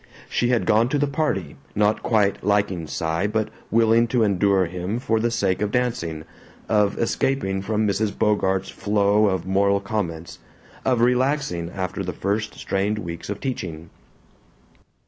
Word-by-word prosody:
She 120 - 0
had 125 -2 +2
gone 115 +2 +3
to 145 - +1
the 145 - +2
party, 135 - -2 0.2
not 105 +1 +2
quite 105 -4 +1
liking 100 -5 +1
Cy 80 +5 -1
but 110 0 -1 0.2
willing 115 +1 +4
to 115 0 +2
endure 100 -2 +3
him 90 +5 -3
for 115 -3 0
the 120 +2 +1
sake 100 -5 0
of 105 - +1
dancing, 105 -11 -1 0.4
of 105 -2 +2
escaping 115 -5 0
from 105 +1 0
Mrs. 100 0 -1
Bogart's 95 -2 +1
flow 105 0 +2
of 95 -2 -1
moral 100 +1 +2
comments, 85 -6 -4 0.4
of 125 -3 +2
relaxing 125 - +1
after 95 +1 -4
the 90 -1 -4
first 105 +2 -2
strained 100 +2 -1
weeks 85 -4 -6
of 105 - -3
teaching. 85 - -5
105 Hz, 150 wpm, -23 LUFS, 95-115 Hz, 0.4 s, willing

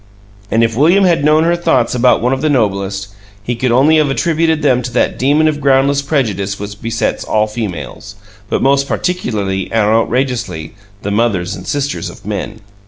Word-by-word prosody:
And 115 +1 +2
if 115 -1 0
William 170 - +4
had 170 -5 +2
known 155 +1 +4
her 170 +1 +2
thoughts 170 -8 +1
about 125 -1 +3
one 125 +2 +2
of 135 - -3
the 155 - +1
Noblest, 100 -6 -1 0.3
he 120 +3 -2
could 125 +1 -1
only 140 +6 +4
have 150 -2 +2
attributed 160 +1 0
them 125 -4 +3
to 125 - -5
that 125 - 0
demon 145 +4 +3
of 150 -1 -1
groundless 140 +1 +3
prejudice 105 - -2
which 105 0 -8
besets 115 0 -2
all 110 0 +1
females, 105 -8 -6 0.3
but - - -1
most 140 +1 +2
particularly 105 - -2
and 110 -2 0
outrageously 115 - -1 0.3
the 100 - -2
mothers 100 -4 0
and 90 - -10
sisters 145 0 -2
of - - -14
Men. 105 +1 -5
125 Hz, 180 wpm, -15 LUFS, 105-145 Hz, 0.3 s, William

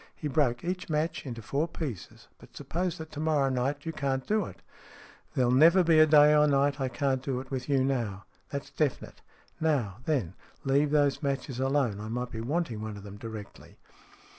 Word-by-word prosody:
He 150 - -4
broke 135 -5 +1
each 180 0 -3
match 155 -1 -1
into 115 -3 -6
four 145 +9 -1
pieces. 140 - -7
" - - -43
But - - -15
suppose 180 0 -2
that 160 -1 -9
to 145 - -7
morrow 150 -4 +2
night 135 +4 -1
you 165 - -3
can't 135 -3 -2
do 215 -2 +1
it? - - -12 0.2
" - - -19
" - - -27
There'll 125 -2 +3
never 165 +8 +6
be 165 -2 +5
a 155 - +7
day 150 0 +7
or 150 0 +5
night 140 0 +2
I 130 - 0
can't 130 +1 0
do 135 -2 -2
it 130 +1 -10
with 130 0 -4
you 135 -2 +3
now. 115 -8 -2 0.2
That's 140 0 -5
definite. 150 -4 -2 0.4
Now, 135 -12 0
then, 125 - 0 0.3
leave 140 +2 +2
those 145 -1 +2
matches 135 -3 -2
alone. 135 -6 +1
I 105 - -6
might 125 +2 -3
be 110 - -5
wanting 125 -3 -2
one 110 -1 -5
of 100 - -10
them 100 0 -9
directly." 110 -2 -9
140 Hz, 210 wpm, -29 LUFS, 125-150 Hz, 0.4 s, a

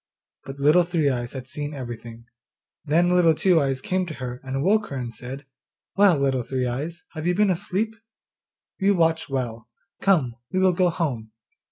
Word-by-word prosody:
But 135 0 -8
Little 150 +5 +5
Three 170 -4 +1
eyes 120 -1 -3
had 130 -2 -7
seen 145 +2 -5
everything. 120 -3 -8 0.6
Then 170 +4 +3
Little 170 -3 +5
Two 175 -1 +3
eyes 135 -1 -1
came 185 +3 -1
to 155 - -6
her, 125 -1 -6
and 135 +1 -2
woke 210 +3 +3
her 140 - -6
and 120 -3 -4
said, 130 +5 -8 0.5
'Well, 195 -5 +5
Little 135 -2 +1
Three 130 +1 -2
eyes, 150 +8 -4
have 155 +1 -4
you 180 - +2
been 205 0 +3
asleep? 195 +5 -1 0.9
You 200 0 +3
watch 165 -3 +1
well! 120 -4 -4 0.3
Come, 145 -12 +2
we - - -2
will 185 -1 +4
go 180 0 +3
home. 125 -11 -3
145 Hz, 180 wpm, -24 LUFS, 130-180 Hz, 0.9 s, Little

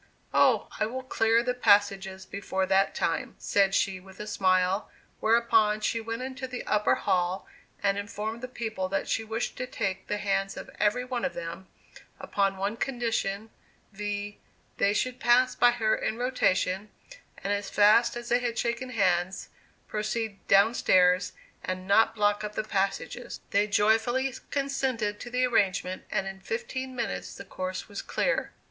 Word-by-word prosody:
"Oh, - - +4
I 215 - +2
will 260 +3 -5
clear 230 -2 +2
the 250 0 0
passages 200 -4 +2
before 190 -1 -2
that 195 +1 +2
time," - - -1
said 195 -1 +2
she, 190 -1 +1
with 190 +1 -16
a 210 - -5
smile; 185 -1 +1 0.3
whereupon 220 -2 +3
she 225 +2 -1
went 230 +2 -4
into 260 0 -5
the 250 -1 -6
upper 210 0 +2
hall, 180 +1 0 0.4
and 200 0 +2
informed 210 +3 -5
the 255 - -4
people 220 -6 -4
that 195 - -1
she 225 - 0
wished 225 +1 -3
to 255 - -3
take 190 -5 -3
the 210 - -1
hands 195 -1 -1
of - - -8
every 210 +4 +2
one 250 -2 -3
of 270 - -2
them, 170 +3 -6 0.5
upon 195 -1 0
one 200 +4 -2
condition, 225 -5 -2 0.4
viz: 205 0 -4 0.4
they 200 - +3
should 250 +4 -1
pass 250 +1 +4
by 245 - +5
her 225 -3 +1
in 220 - -2
rotation, 205 -5 +1 0.5
and 200 - 0
as 205 0 -3
fast 215 +4 +4
as 240 0 -7
they 240 - +4
had 240 -1 -2
shaken 235 +2 -1
hands, 185 -5 0 0.4
proceed 215 -1 -3
down 200 +4 +5
stairs, 180 -4 +3 0.3
and 185 0 -4
not 220 +2 +4
block 205 0 +2
up 210 0 -5
the - - -1
passages. 195 -2 -2
They 205 +1 +3
joyfully 225 +6 +2 0.2
consented 265 -7 -1
to 240 - -7
the 250 +1 +2
arrangement, 190 -5 0
and 195 - -1
in 195 0 -6
fifteen 265 - -4
minutes 235 -4 -4
the - - -9
course 185 -1 -5
was 205 - -6
clear. - - -1
210 Hz, 165 wpm, -28 LUFS, 195-240 Hz, 0.5 s, by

